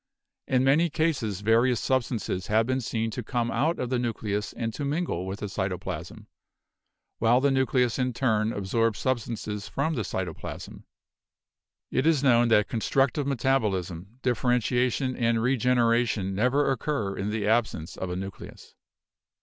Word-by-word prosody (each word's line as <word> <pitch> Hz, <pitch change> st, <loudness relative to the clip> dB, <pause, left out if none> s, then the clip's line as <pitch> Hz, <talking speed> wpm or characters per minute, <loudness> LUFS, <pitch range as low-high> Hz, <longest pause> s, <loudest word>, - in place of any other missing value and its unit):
In 130 Hz, -1 st, +2 dB
many 150 Hz, +6 st, +4 dB
cases 140 Hz, -, -1 dB
vari 115 Hz, +4 st, +4 dB
ous 120 Hz, -, -2 dB
substances 115 Hz, -8 st, -1 dB
have 110 Hz, +1 st, +3 dB
been 130 Hz, +2 st, 0 dB
seen 115 Hz, -1 st, -2 dB
to 125 Hz, -, -4 dB
come 120 Hz, 0 st, -2 dB
out 150 Hz, +8 st, +1 dB
of 125 Hz, 0 st, -3 dB
the 125 Hz, -, +1 dB
nucleus 105 Hz, -3 st, -2 dB
and 115 Hz, -1 st, -4 dB
to 145 Hz, -, -5 dB
mingle 140 Hz, -, -2 dB
with 95 Hz, +1 st, -5 dB
the -, -, -2 dB
cytoplasm, 95 Hz, -2 st, -4 dB, 0.9 s
while 120 Hz, +2 st, +4 dB
the 140 Hz, +1 st, +2 dB
nucleus 130 Hz, -2 st, +1 dB
in 125 Hz, 0 st, +1 dB
turn 110 Hz, -3 st, +1 dB
absorbs 110 Hz, +2 st, 0 dB
substances 110 Hz, -5 st, -3 dB
from 155 Hz, +4 st, -1 dB
the 125 Hz, -, -1 dB
cytoplasm. 95 Hz, -5 st, -6 dB, 1.1 s
It 130 Hz, +4 st, +1 dB
is 155 Hz, -4 st, +3 dB
known 120 Hz, -3 st, +5 dB
that 105 Hz, -2 st, +4 dB
constructive 135 Hz, +4 st, +1 dB
metabolism, 105 Hz, -7 st, -1 dB
differentiation 125 Hz, +1 st, +1 dB
and 115 Hz, -1 st, +1 dB
regenera 120 Hz, -1 st, +2 dB
tion 95 Hz, -2 st, -2 dB
never 125 Hz, +8 st, +2 dB
occur 125 Hz, -7 st, -2 dB
in 100 Hz, +2 st, -3 dB
the 105 Hz, -1 st, -2 dB
absence 110 Hz, -8 st, 0 dB
of 95 Hz, -, -4 dB
a 90 Hz, -, -3 dB
nucleus. 95 Hz, +1 st, -8 dB
120 Hz, 150 wpm, -27 LUFS, 105-130 Hz, 1.1 s, known